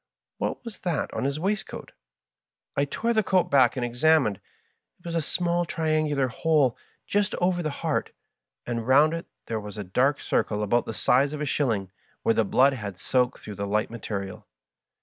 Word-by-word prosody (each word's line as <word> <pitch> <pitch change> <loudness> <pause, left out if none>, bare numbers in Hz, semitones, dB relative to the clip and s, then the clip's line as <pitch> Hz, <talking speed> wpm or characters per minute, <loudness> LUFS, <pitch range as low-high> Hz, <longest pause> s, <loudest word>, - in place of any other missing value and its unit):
"What - - -3
was 230 -2 -8
that 175 -6 -2
on - - -2
his 140 +2 -1
waistcoat? 195 +3 -3 0.8
I 140 - +2
tore 230 +11 -1
the 220 - +3
coat 185 -3 +1
back 130 -4 +5
and 125 - 0
examined: 120 -3 +2 0.6
it 175 - -29
was 170 - -4
a 165 - +1
small 175 +2 0
triangular 155 -4 0
hole 145 -1 +2 0.3
just 205 -1 0
over 180 0 +1
the 155 - -1
heart, 140 - -2 0.5
and 115 -1 -3
round 145 +4 +5
it 165 0 -5 0.2
there 110 -1 -2
was 105 0 -9
a 105 - -3
dark 130 +10 +1
circle 105 0 0
about 120 +3 +1
the 110 - -4
size 140 +4 +3
of 150 - -4
a - - 0
shilling, 115 -10 0 0.3
where 115 - +3
the 115 - +2
blood 130 +7 +4
had 100 -7 -6
soaked 125 +7 0
through 105 - -7
the 100 0 -3
light 105 +2 0
material. 100 -4 -5
140 Hz, 185 wpm, -26 LUFS, 115-160 Hz, 0.8 s, back